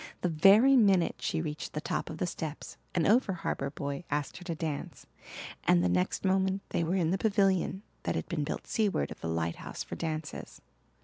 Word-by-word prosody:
The 180 - +1
very 200 +11 +6
minute 195 -8 +4
she 160 0 -1
reached 150 -2 -5
the 150 - -2
top - - -3
of 160 - -6
the 180 - 0
steps 160 -3 -5 0.2
an 170 -3 +2
over 220 -2 +4
harbour 140 -5 -2
boy 140 +2 -4
asked 145 -1 -2
her - - -10
to 170 -2 -3
dance 155 -3 -5 0.6
and 90 0 +4
the 90 - +2
next 90 - 0
moment 190 +1 +1
they - - 0
were 170 +3 0
in 170 -3 +1
the 190 - 0
pavilion 195 -2 +2 0.2
that - - -2
had - - -3
been 165 -5 -1
built 145 - -4
seaward 205 - 0
of - - -9
the - - -3
lighthouse 80 0 -3
for - - -7
dances. 155 -2 -5
165 Hz, 200 wpm, -30 LUFS, 150-190 Hz, 0.6 s, very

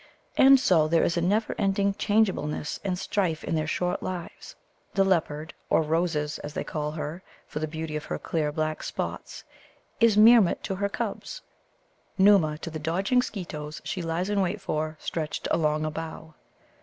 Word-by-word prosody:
And 270 0 +7
so 165 -10 +4
there 165 +1 +3
is 170 - +1
a 170 - +1
never 205 +6 +1
ending 200 -1 +2
changeableness 195 -9 0
and 185 -3 -1
strife 180 -4 -1
in - - -3
their 155 -1 0
short 180 +2 -1
lives. 180 -2 -6 0.4
The 195 - +4
leopard 160 -4 0 0.2
(or - - +3
Roses, 155 -1 -1
as 145 +1 -8
they - - -2
call 150 -1 -3
her, 155 +2 -5 0.2
for - - -6
the 155 - -2
beauty 160 0 -5
of 150 - -4
her - - -3
clear 155 -3 -1
black 155 0 -2
spots) - - -5 0.6
is 230 -3 +4
Meermut 220 -3 +6
to - - -2
her 200 +1 0
cubs, - - -5 0.8
Nōōma 190 -6 +5
to 165 - -5
the 155 - -5
dodging 190 +11 +1
Skeetoes 155 -10 -6
she 185 - -3
lies 170 +4 -2
in 200 -1 +2
wait 190 +3 -1
for, 155 -3 -3
stretched 155 -2 -3
along 155 -1 +1
a 155 - -2
bough. 160 0 -7
165 Hz, 175 wpm, -27 LUFS, 155-195 Hz, 0.8 s, And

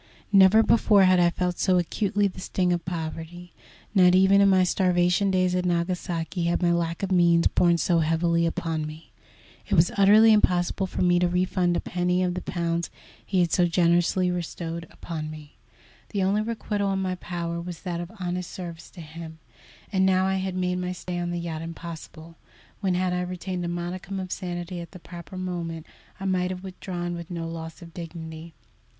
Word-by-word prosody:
Never 195 +2 +7
before 215 -3 +4
had 185 -1 +5
I 175 -1 +5
felt 180 +1 -2
so 185 -2 +3
acutely 200 +3 +1
the 185 - -8
sting 180 -1 0
of 170 -1 -2
poverty. 170 +1 -6 0.4
Not 180 -3 +6
even 190 +1 +5
in 200 - +6
my 190 -1 +5
starvation 180 +1 +2
days 185 -1 +2
at 180 0 0
Nagasaki 175 0 -1
had 170 +2 0
my 170 - +4
lack 170 +1 -1
of 195 - -2
means 170 -2 +4
borne 170 -1 +3
so 170 +1 +2
heavily 170 +1 +2
upon 160 -2 -2
me. 155 0 -11 0.6
It - - +2
was 165 +2 +4
utterly 215 +3 +7
impossible 185 -2 +2
for 185 - -2
me 175 -1 +4
to 180 - +3
refund 180 0 +1
a - - 0
penny 180 +1 0
of 180 -1 0
the 180 - -4
pounds 170 -1 -2 0.3
he 190 -2 +1
had 170 -2 +1
so 175 -1 +3
generously 175 +1 +2
bestowed 170 -1 -5
upon 155 -2 -6
me. 155 -1 -11 0.5
The 200 -3 -1
only 200 +3 +2
requital 210 -3 -2
in 190 - -1
my 185 -1 -1
power 170 -2 -4
was 175 -1 -8
that 175 -2 -3
of 175 - -7
honest 180 -1 -3
service 170 -3 -8
to 175 - -11
him, 160 +1 -9 0.6
and 190 -1 +3
now 190 0 +3
I 190 0 +1
had 190 -1 -3
made 180 0 0
my 180 0 -3
stay 180 -1 -5
on 175 0 -2
the 175 - -2
yacht 165 -2 -4
impossible, 165 0 -9 0.4
when, 190 -3 0
had 180 0 0
I 180 - 0
retained 180 0 -4
a - - -2
modicum 180 +3 -4
of 185 -1 -6
sanity 175 0 -4
at 170 - -11
the 185 - -10
proper 175 +2 -10
moment, 170 -3 -4 0.3
I 195 - -5
might 185 -1 +1
have 185 0 -6
withdrawn 180 -2 -5
with 170 -1 -7
no 170 -2 -4
loss 165 0 -7
of 165 -1 -13
dignity. 165 -1 -8
175 Hz, 195 wpm, -25 LUFS, 170-185 Hz, 0.6 s, Never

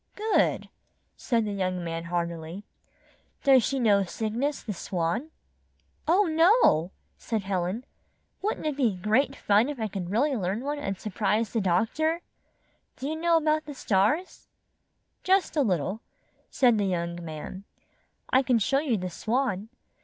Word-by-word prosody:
''Good!" 430 +1 +1 0.5
said 230 -3 0
the 205 - -3
young 185 -2 -2
man, 165 0 -4
heartily. 170 +1 -4 0.8
"Does 270 -2 +6
she 270 +3 -1
know 210 -5 +4
Cygnus, 230 +9 -2
the 215 - -4
Swan?" 180 - -2 0.8
"Oh, 365 +6 +5
no!" 325 - +4 0.3
said 220 -4 -2
'Helen. 190 +5 -2 0.6
"Wouldn't 420 -5 -2
it 305 -2 0
be 245 -8 +1
great 220 +9 +1
fun 210 +4 +3
if 290 -4 -5
I 220 - -1
could 190 -3 -5
really 265 +8 +1
learn 195 +1 -2
one 290 +2 -3
and 195 -8 -4
sur 215 - -6
prise 210 +3 0
the 225 - +1
doctor! 230 - +1 0.7
Do 265 - -5
you 310 - -2
know 335 +1 +3
about 310 0 +1
the 295 -1 -8
stars?" 225 - 0 0.8
"Just 380 -1 +2
a 300 - +3
little," 195 - 0 0.5
said 240 -5 +3
the 205 - +1
young 170 -2 -2
man. 160 +4 -7 0.7
"I 260 - +5
can 255 -2 +2
show 270 +6 +2
you 275 -7 0
the 180 -1 -4
Swan. 225 0 -1
220 Hz, 155 wpm, -27 LUFS, 185-285 Hz, 0.8 s, Does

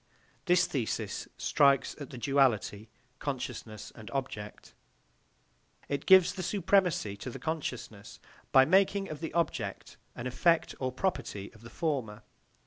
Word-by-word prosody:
This 180 0 +4
thesis 125 -6 -3
strikes 140 -2 +3
at 140 - -7
the 130 - -9
duality 120 -5 +1 0.3
consciousness 125 -6 -5
and 110 -2 -11
object; 130 -7 -5 1.1
it 140 0 -3
gives 185 -1 +7
the 190 - -5
supremacy 180 - +1
to 125 - -6
the - - -7
consciousness 125 -10 -5 0.3
by 130 -1 +7
making 195 +3 +3
of 155 - -6
the 160 0 -4
object 170 0 -2 0.2
an 120 - -6
effect 165 +6 +2
or 130 -1 -1
property 125 - -3
of 110 - -17
the 115 - -11
former. 120 -10 -3
135 Hz, 135 wpm, -30 LUFS, 115-170 Hz, 1.1 s, gives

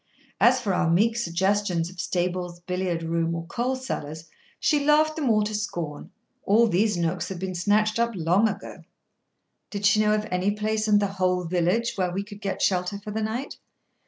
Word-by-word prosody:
As 255 +2 +5
for 205 -6 -1
our 175 -2 +1
meek 215 +7 +3
suggestions 190 -3 0
of 185 - -15
stables, 175 0 -2
billiard 180 -1 -2
room, 165 0 -1
or 165 0 -5
coal 245 +9 -1
cellars, 160 - -6 0.3
she 295 -2 +2
laughed 305 +1 +3
them 300 -6 -1
all 215 -2 +3
to 210 +1 -3
scorn: 170 -8 -4 0.3
all 220 +4 +4
these 210 -1 +1
nooks 170 +1 -1
had 190 - -5
been 185 +1 -4
snatched 210 +5 +1
up 235 0 +2
long 180 +6 +2
ago. 200 -1 -7 0.9
Did 205 -1 -4
she 200 +2 +5
know 210 0 +3
of 215 0 -2
any 180 +2 +1
place 215 +1 -1
in 210 -1 +5
the 205 - +2
whole 185 -2 0
village 180 +7 0
where 180 -2 0
we 195 +3 -2
could 205 0 -12
get 195 -2 -2
shelter 180 +1 +1
for 210 +1 -8
the 220 +1 -2
night? 230 +6 -3
200 Hz, 190 wpm, -25 LUFS, 175-215 Hz, 0.9 s, As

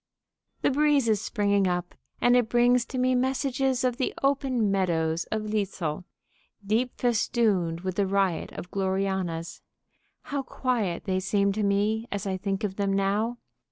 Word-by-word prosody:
"_ - - -43
The - - +3
breeze 290 -2 +3
is 215 -3 +2
springing 200 -3 +1
up, 175 0 -2 0.3
and 245 0 +4
it 245 -3 +3
brings 240 0 +4
to 260 - -6
me 255 0 +2
messages 260 0 0
of 250 -2 +1
the 260 - -1
open 265 -6 +1
meadows 165 -4 0
of 220 -1 -3
Litzel, 195 -6 -2 0.6
deep 230 +5 0
festooned 210 -8 +1
with 185 0 -4
the 200 -1 +2
riot 195 -3 0
of 180 - -8
gloriannas. 190 -4 -2 0.6
How 280 -1 -3
quiet 235 -10 -2
they 185 -1 0
seem 200 +1 +1
to 210 +2 -2
me 210 +3 +1
as 205 0 -3
I 190 -1 -1
think 195 +2 -3
of 195 -2 -2
them 200 -1 0
now! 205 +5 0
205 Hz, 160 wpm, -27 LUFS, 190-245 Hz, 0.6 s, and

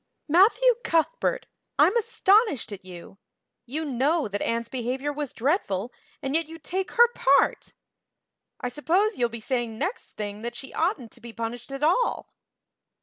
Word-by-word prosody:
"Matthew 435 +10 +5
Cuthbert, - - 0 0.3
I'm 390 - +5
astonished 435 - +3
at 195 -2 -8
you. 185 +1 -11 0.5
You 310 +6 -3
know 285 +2 +1
that 205 0 -4
Anne's 230 0 -1
behavior 260 +4 -3
was 290 -2 -4
dreadful, 240 - -1 0.3
and 270 - -2
yet 325 0 +1
you 325 +1 -9
take 370 +4 -4
her 475 0 +7
part! 275 +1 +2 0.9
I - - -3
suppose 365 - +1
you'll 240 -1 +2
be 235 0 -7
saying 235 -1 -2
next 380 - -4
thing 205 0 -5
that 235 +1 -5
she 270 - -8
oughtn't 315 - -1
to 240 - -18
be 235 -1 -10
punished 230 +3 -5
at 275 +1 -5
all!" 410 +11 +1
275 Hz, 155 wpm, -26 LUFS, 235-360 Hz, 0.9 s, her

